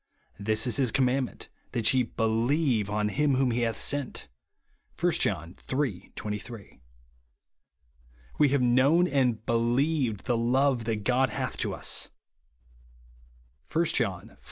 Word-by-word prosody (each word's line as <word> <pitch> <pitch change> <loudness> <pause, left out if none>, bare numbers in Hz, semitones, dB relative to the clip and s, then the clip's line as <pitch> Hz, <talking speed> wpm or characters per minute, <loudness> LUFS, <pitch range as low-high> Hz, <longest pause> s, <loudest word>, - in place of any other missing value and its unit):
"This 110 +3 +1
is 125 - +1
his 130 -4 +1
commandment, 130 -1 0 0.3
that 115 0 +3
ye 130 - +3
believe 115 +1 0
on 105 0 0
him 145 +4 +1
whom 130 -1 +2
he 120 - -1
hath 115 -2 -1
sent," 145 -2 -1 0.7
(1 - - +2
John 85 +3 -1 0.2
iii. 130 -9 -2
23). 105 - -7 1.6
"We 145 - +5
have 140 -1 +1
known 135 +9 +4
and 125 -7 0
believed 120 0 0
the 120 - +1
love 125 +1 +1
that 110 -2 -2
God 130 +3 +2
hath 105 - -3
to - - -1
us," - - 0 1.6
(1 170 +1 +2
John 95 -8 -1
iv. - - -21
120 Hz, 130 wpm, -27 LUFS, 110-135 Hz, 1.6 s, We